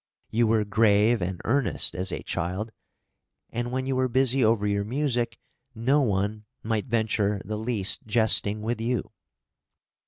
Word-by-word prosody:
You 115 +1 +2
were 110 -1 +2
grave 105 +1 +3
and 90 0 -3
earnest 140 +4 +1
as 95 +1 -2
a - - -4
child; 95 +7 -3 0.8
and 120 +1 -3
when 130 +1 -2
you 135 0 -1
were 130 0 +2
busy 130 +1 +2
over 110 -1 +2
your 100 0 0
music, 120 -1 -1 0.4
no 130 +6 +2
one 105 -2 -1 0.2
might 110 0 -1
venture 110 -3 0
the 105 +2 -4
least 110 -3 +1
jesting 110 -1 +2
with 115 0 -2
you. 120 -1 0
110 Hz, 150 wpm, -26 LUFS, 105-120 Hz, 0.8 s, grave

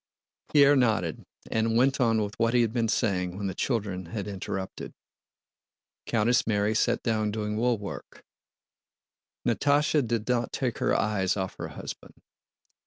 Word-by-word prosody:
Pierre 145 -1 +6
nodded, 110 - 0 0.2
and 115 +1 +1
went 135 +2 +3
on 115 -3 +3
with 105 0 -5
what 115 +1 +2
he 120 - +5
had 115 -1 -1
been 115 -2 +1
saying 95 -5 0
when 100 - -4
the 95 - -2
children 100 -8 -2
had 100 +3 -5
interrupted. 95 -1 -5 1.1
Countess 115 +1 +2
Mary 105 -1 +1
sat 110 - +1
down 110 -2 0
doing 105 0 -3
woolwork; 110 -3 -3 1.2
Natásha 145 +3 +2
did 115 -2 -1
not 120 -2 0
take 125 -5 -2
her - - +2
eyes 100 -3 0
off 95 -1 -3
her - - -4
husband. - - -9
110 Hz, 145 wpm, -27 LUFS, 100-120 Hz, 1.2 s, Pierre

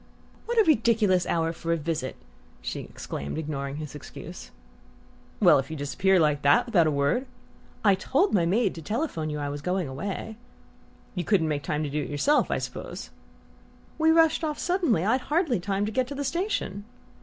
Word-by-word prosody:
"What 475 0 -2
a 445 - +7
ridiculous 220 - +3
hour 165 0 0
for 165 0 -4
a 170 - +2
visit!" 150 -4 -3 0.4
she 60 - -4
exclaimed, 70 - -6
ignoring 140 -3 -3
his 150 -1 -6
excuse. 145 - -9 0.9
"Well, - - +6
if 135 - -4
you 160 - -5
disappear 185 +7 +2
like 150 -2 +2
that, 140 0 +4
without 180 -9 +3
a - - +2
word 145 - +1 0.3
" - - -19
"I 200 - +7
told 270 - +1
my 180 - +4
maid 200 +2 +2
to 165 - -8
telephone 210 - -2
you 150 - -3
I 145 -1 -3
was 145 0 -5
going 180 0 -1
away." 200 +10 -5 0.8
"You 180 - -2
couldn't 180 -4 +2
make 145 -1 -1
time 150 +2 -2
to 150 - -2
do 150 +1 -1
it - - -5
yourself, 280 - +2
I - - +1
suppose?" - - -6 0.9
"We 320 0 +4
rushed 325 0 +4
off 305 -2 -1
suddenly; 335 - +1
I'd 250 +5 +2
hardly 300 - +2
time 195 +3 -1
to 215 - -3
get 255 +3 0
to 285 - -6
the 285 - -3
station." 340 - -2
185 Hz, 190 wpm, -26 LUFS, 150-255 Hz, 0.9 s, a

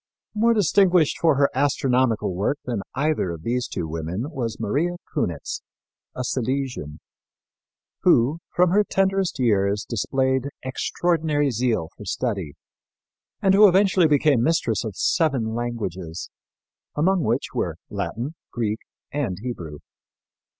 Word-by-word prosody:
More 230 +2 +3
distinguished 185 -4 +3
for 160 -3 +4
her 140 0 +3
astronomical 130 -6 +1
work 100 +10 0
than 120 -5 -2
either 150 - 0
of 85 -2 -6
these 125 +3 -1
two 80 - -4
women 85 - -4
was 120 -7 -4
Maria 145 +11 0 0.2
Cunitz, 85 -4 -2 0.5
a 125 - -3
Silesian, 125 - -2 1.0
who, 135 +8 +3 0.2
from 180 0 +4
her 205 +2 +4
tenderest 195 -3 0
years, 105 -5 +1
displayed 130 +3 0 0.2
extraordinary 150 +1 0
zeal 115 -8 0
for 105 - -11
study 95 - -2 0.9
and 195 -1 +5
who 205 +2 +8
eventually 185 -2 +4
became 145 -4 +3
mistress 125 -6 +1
of 110 -5 -5
seven 135 - +1
languages, 95 -8 -4 0.6
among 180 +5 +2
which 120 0 -1
were - - -1 0.2
Latin, 125 +7 -3 0.2
Greek 110 -2 -2 0.3
and 130 -11 -1
Hebrew. 90 -11 -6
130 Hz, 120 wpm, -23 LUFS, 110-155 Hz, 1.0 s, who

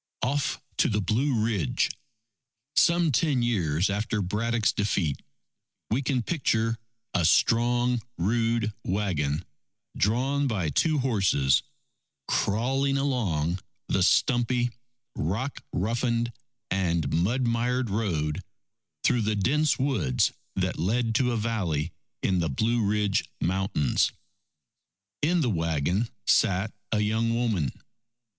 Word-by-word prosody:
Off 140 +2 0 0.2
to - - +3
the 105 -2 +1
Blue 110 +3 +1
Ridge 100 - 0 0.8
Some 170 -2 +4
ten 135 -1 +2
years 90 -7 +1
after 105 +2 -1
Braddock's 110 +4 +1
defeat, 85 -8 0 0.7
we 120 +5 +2
can 130 -3 0
picture 115 -8 0 0.3
a 90 - +2
strong 120 +6 +3 0.2
rude 115 +3 +1
wagon 90 -6 -1 0.5
drawn 135 +7 +1
by 95 - -1
two 155 - +2
horses, 95 - +2 0.7
crawling 135 +6 +1
along 95 - 0 0.3
the - - +1
stumpy, 120 0 +2 0.4
rock 105 - -2
roughened, 115 +3 0 0.4
and 85 -4 0
mud 110 +11 +1
mired 120 0 0
road 80 -8 -1 0.6
through 125 -2 +3
the 110 0 0
dense 145 +9 +2
woods 100 - +1 0.2
that - - -1
led 115 +7 +1
to 125 +2 +2
a 120 - 0
valley 95 -9 -1 0.3
in 95 -1 +2
the 85 -2 0
Blue 115 - +1
Ridge 105 -1 +1
Mountains. 95 - +1 1.1
In 170 +3 +2
the 125 -6 +1
wagon 85 +5 0 0.2
sat 100 0 +2 0.2
a 105 - +2
young 110 +2 +1
woman. 105 - 0
110 Hz, 110 wpm, -27 LUFS, 90-120 Hz, 1.1 s, Some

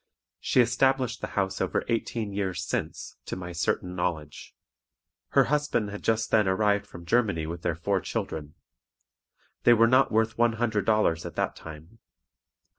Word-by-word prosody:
She 125 - +3
established 130 +1 +1
the - - -3
house 95 -1 0
over 95 - 0
eighteen 115 -2 -2
years 95 -2 -2
since, - - -4
to - - -3
my 90 -1 -6
certain 90 +1 -2
knowledge. 80 -5 -4 0.8
Her - - +6
husband 145 -8 0
had 105 - -7
just 115 0 0
then 105 -3 +4
arrived 100 +1 +1
from 85 - -11
Germany 105 -5 +1
with 85 +1 -6
their 85 - -1
four 95 +3 -1
children. 75 -2 -5 1.1
They 120 - +6
were 115 0 +5
not 130 +3 +4
worth 110 +1 +1
one 120 -1 +4
hundred 110 -2 -1
dollars 105 -7 +2
at - - -8
that - - -1
time. 80 +7 -12
105 Hz, 160 wpm, -27 LUFS, 90-115 Hz, 1.1 s, Her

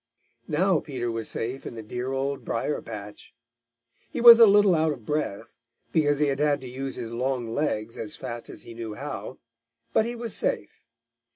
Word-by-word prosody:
Now 175 +2 +2
Peter 125 -5 -4
was 115 -1 -2
safe 125 +4 -4
in - - -7
the 110 - -7
dear 125 +4 -4
Old 135 +1 -2
Briar 115 +6 -2
patch. 105 -1 -9 0.7
He - - -5
was 235 -1 +10
a 230 - +10
little 205 -1 +6
out 160 -1 +2
of 125 -7 -7
breath, 115 -7 -3 0.3
because 145 -3 +2
he 150 - +2
had 140 -1 -1
had 145 -1 +2
to 130 - -8
use 135 +2 -5
his 115 - -6
long 120 -1 -2
legs 115 -7 -2
as 105 - -4
fast 115 0 -7
as - - -9
he 115 - -10
knew 115 -2 -6
how, 140 0 -6 0.6
but 220 - +3
he 240 - -4
was 235 -2 -4
safe. - - -2
135 Hz, 190 wpm, -26 LUFS, 115-150 Hz, 0.7 s, was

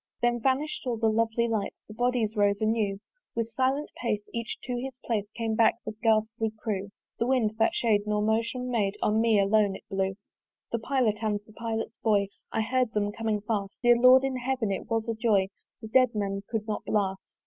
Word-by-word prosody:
Then 240 0 +2
vanish'd 270 +2 0
all 240 -2 0
the 220 0 +2
lovely 230 +1 +1
lights; 220 -3 -2
The 215 - -10
bodies 240 -1 0
rose 200 -1 +2
anew: 215 -2 +1 0.4
With 230 0 -2
silent 265 +5 0
pace, 215 -4 -1
each 235 -1 -3
to 250 - -3
his 260 +1 -5
place, 210 -3 -1
Came 225 -1 -1
back 220 0 +4
the 215 - -3
ghastly 220 0 +1
crew. 205 -3 -3 0.3
The 235 - +1
wind, 250 -5 +2
that 225 - +3
shade 210 -3 +2
nor 210 0 +1
motion 230 +3 0
made, 205 -4 0
On 215 +1 +3
me 225 -2 +4
alone 200 0 +3
it - - -10
blew. 195 0 0 0.6
The 235 - 0
pilot, 235 -3 +1
and 210 -2 0
the 215 - -17
pilot's 225 0 -4
boy 205 -3 +2 0.2
I - - 0
heard 250 +1 0
them 205 -1 0
coming 220 -1 -2
fast: 200 -2 -3
Dear 240 0 +7
Lord 255 +2 +7
in 270 -1 -1
Heaven! 250 -4 -1
it 195 - -4
was 225 0 0
a 230 - 0
joy, 215 -4 +2 0.3
The - - -5
dead 255 +1 +4
men 195 -1 -1
could 225 -2 -2
not 215 - -3
blast. 195 -2 -2
225 Hz, 205 wpm, -28 LUFS, 210-240 Hz, 0.6 s, Dear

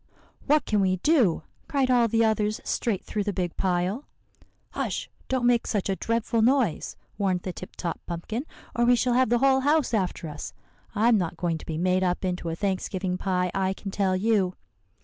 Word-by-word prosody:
"'What 295 -1 +3
can 210 - +1
we 190 -1 +2
do?' 205 - +2 0.2
cried 270 -3 +1
all 240 -2 +4
the 225 +1 +2
others 215 -1 +1
straight 210 -6 -1
through 210 - -2
the 205 - -1
big 180 -3 -3
pile. 185 +7 -1 0.7
"'Hush - - -3 0.2
don't 260 -2 0
make 240 -1 +3
such 205 -3 -1
a 195 - +1
dreadful 230 +2 0
noise,' 240 - +2 0.2
warned 190 -3 +1
the 185 - -5
Tip 185 - -10
Top 170 - -4
Pumpkin, 215 - -4 0.3
'or 240 - +2
we 245 +1 +6
shall 245 +1 +1
have 255 -1 +3
the 240 - +4
whole 265 +1 +4
house 290 -1 +2
after 185 -5 -1
us. 150 -1 -7 0.4
I'm 220 +1 +4
not 170 -2 -3
going 170 -2 -1
to - - -13
be 160 - -3
made 185 +2 +2
up 180 +1 0
into 180 -2 -2
a 165 - -2
Thanksgiving 185 -1 -2
pie, 180 -2 0
I 190 -1 0
can 195 0 -7
tell 190 -1 +1
you. 195 -2 +1
200 Hz, 195 wpm, -26 LUFS, 180-240 Hz, 0.7 s, we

